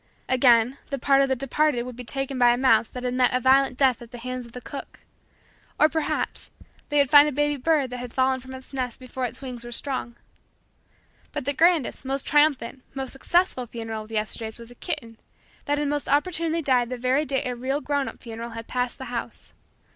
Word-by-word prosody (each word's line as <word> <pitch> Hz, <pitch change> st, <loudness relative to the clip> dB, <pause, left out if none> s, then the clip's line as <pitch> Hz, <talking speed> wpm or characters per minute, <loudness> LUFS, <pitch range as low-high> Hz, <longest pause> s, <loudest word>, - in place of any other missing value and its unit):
Again, 250 Hz, 0 st, +4 dB
the 275 Hz, -, -2 dB
part 275 Hz, +1 st, +4 dB
of 275 Hz, -, +2 dB
the 265 Hz, -, +2 dB
departed 275 Hz, 0 st, +1 dB
would 250 Hz, -1 st, -8 dB
be 250 Hz, -, -8 dB
taken 270 Hz, +2 st, -2 dB
by 245 Hz, -1 st, +6 dB
a -, -, -5 dB
mouse 240 Hz, -4 st, +4 dB
that 250 Hz, -, -8 dB
had 250 Hz, 0 st, -1 dB
met 250 Hz, 0 st, +3 dB
a -, -, +3 dB
violent 260 Hz, 0 st, +4 dB
death 265 Hz, -4 st, +3 dB
at 235 Hz, -, -11 dB
the 245 Hz, -, -9 dB
hands 255 Hz, 0 st, -5 dB
of -, -, -16 dB
the 250 Hz, -, -6 dB
cook; 275 Hz, +3 st, -9 dB, 0.8 s
or, 305 Hz, -, +6 dB
perhaps, 320 Hz, 0 st, -2 dB, 0.4 s
they 295 Hz, -, 0 dB
would 280 Hz, -3 st, +3 dB
find 290 Hz, 0 st, +8 dB
a -, -, -4 dB
baby 295 Hz, +1 st, +1 dB
bird 280 Hz, -1 st, +1 dB
that 250 Hz, -, -5 dB
had 245 Hz, -1 st, -6 dB
fallen 260 Hz, +1 st, +2 dB
from 260 Hz, +1 st, -10 dB
its 260 Hz, +1 st, -11 dB
nest 250 Hz, -3 st, -3 dB
before 255 Hz, 0 st, -4 dB
its 250 Hz, -, -7 dB
wings 250 Hz, -3 st, -6 dB
were 240 Hz, -, -8 dB
strong. 255 Hz, -1 st, -1 dB, 1.2 s
But 290 Hz, -, -4 dB
the 285 Hz, -, 0 dB
grandest, 330 Hz, -4 st, +2 dB
most 270 Hz, 0 st, 0 dB
triumphant, 285 Hz, -4 st, +2 dB
most 265 Hz, -1 st, -3 dB
successful 270 Hz, -2 st, +1 dB
funeral 225 Hz, -1 st, -5 dB
of 215 Hz, -, -12 dB
the 225 Hz, -, -6 dB
Yesterdays 220 Hz, +1 st, -3 dB
was 235 Hz, 0 st, -11 dB
a -, -, -13 dB
kitten 230 Hz, -1 st, -5 dB, 0.5 s
that 290 Hz, 0 st, +1 dB
had 295 Hz, 0 st, 0 dB
most 290 Hz, 0 st, -2 dB
opportunely 330 Hz, +2 st, +1 dB
died 250 Hz, -3 st, +2 dB
the 255 Hz, -, -4 dB
very 255 Hz, +4 st, +1 dB
day 275 Hz, -3 st, -1 dB
a 250 Hz, -1 st, -2 dB
real 265 Hz, +4 st, -1 dB
grown 285 Hz, -2 st, -1 dB
up -, -, -9 dB
funeral 230 Hz, 0 st, -6 dB
had 230 Hz, -, -6 dB
passed 250 Hz, 0 st, -2 dB
the 265 Hz, -, -7 dB
house. 235 Hz, -, -6 dB
260 Hz, 225 wpm, -25 LUFS, 245-280 Hz, 1.2 s, find